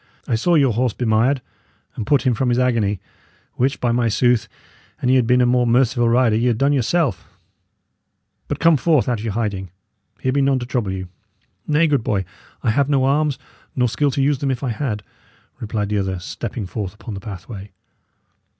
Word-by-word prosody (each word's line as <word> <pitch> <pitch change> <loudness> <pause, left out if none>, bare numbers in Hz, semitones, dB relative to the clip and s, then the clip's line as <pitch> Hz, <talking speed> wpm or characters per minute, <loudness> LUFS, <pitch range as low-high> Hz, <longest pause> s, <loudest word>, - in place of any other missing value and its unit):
I - - -1
saw 170 +10 +2
your 135 -6 +4
horse 120 0 0
bemired, 120 +3 +1 0.5
and 110 - -5
put 145 0 +3
him 130 - +2
from 125 +2 0
his 120 - +2
agony; 115 -6 +1 0.5
which, 130 +2 0
by 120 - +1
my 120 -1 +1
sooth! 120 0 +2 0.5
an 125 - 0
ye 130 - +5
had 125 -3 +3
been 125 +1 +4
a - - +4
more 125 0 +2
merciful 120 0 +3
rider, 120 -2 +3
ye 115 +3 +1
had 120 -3 +1
done 140 +4 +2
yourself. 145 +3 0 1.2
But - - -2
come 165 -2 +4
forth 150 -1 +2
out 120 -3 0
of - - -7
your 110 -3 -3
hiding. 100 -5 -2 0.5
Here 130 - 0
be 140 +2 +1
none 135 -1 +3
to 125 - -4
trouble 120 -7 -2
you." 95 -1 -5 0.6
"Nay, 155 +2 +3
good 145 -7 +1
boy, 100 -7 -1 0.4
I 115 - +2
have 140 +4 +1
no 135 -2 +2
arms, 145 0 +1 0.4
nor 125 -1 +2
skill 145 +5 +1
to 135 +1 0
use 140 -1 +1
them 140 - -1
if 130 0 -2
I 130 - -1
had," 110 -3 -3 0.6
replied 105 -2 -3
the 105 -1 0
other, 95 -1 -2
stepping 105 +4 -5
forth 95 0 -5
upon 110 +1 -8
the 100 - -5
pathway. 100 +1 -8
120 Hz, 205 wpm, -20 LUFS, 110-135 Hz, 1.2 s, ye